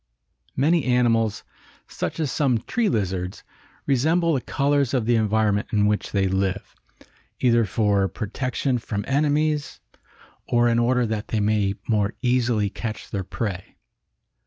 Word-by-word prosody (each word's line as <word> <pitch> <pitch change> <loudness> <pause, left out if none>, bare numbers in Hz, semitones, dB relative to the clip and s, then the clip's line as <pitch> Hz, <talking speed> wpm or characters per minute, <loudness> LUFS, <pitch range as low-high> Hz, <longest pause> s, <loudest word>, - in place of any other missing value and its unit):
Many 155 +4 +2
animals, 115 -4 +2 0.4
such - - -4
as 150 -5 -1
some 125 -6 +1
tree 230 - 0
lizards, 95 -4 -2 0.4
resemble 160 +5 +2
the 135 - 0
colors 140 -1 0
of 120 -4 0
the 120 +1 +3
environment 110 -1 +1
in 105 -1 +2
which 105 0 0
they 100 -1 +1
live, 95 0 -2 0.7
either 120 -2 +3
for 100 -1 +1
protection 125 +5 -2
from 105 -3 -4
enemies 150 +1 0 0.7
or 120 0 +3
in 115 0 +2
order 125 +1 +2
that 110 -1 -3
they 110 - -1
may 105 -1 +1
more 105 -2 +1
easily 120 -4 +2
catch 110 +2 -6
their 100 -2 -2
prey. 95 0 -5
115 Hz, 135 wpm, -23 LUFS, 105-130 Hz, 0.7 s, the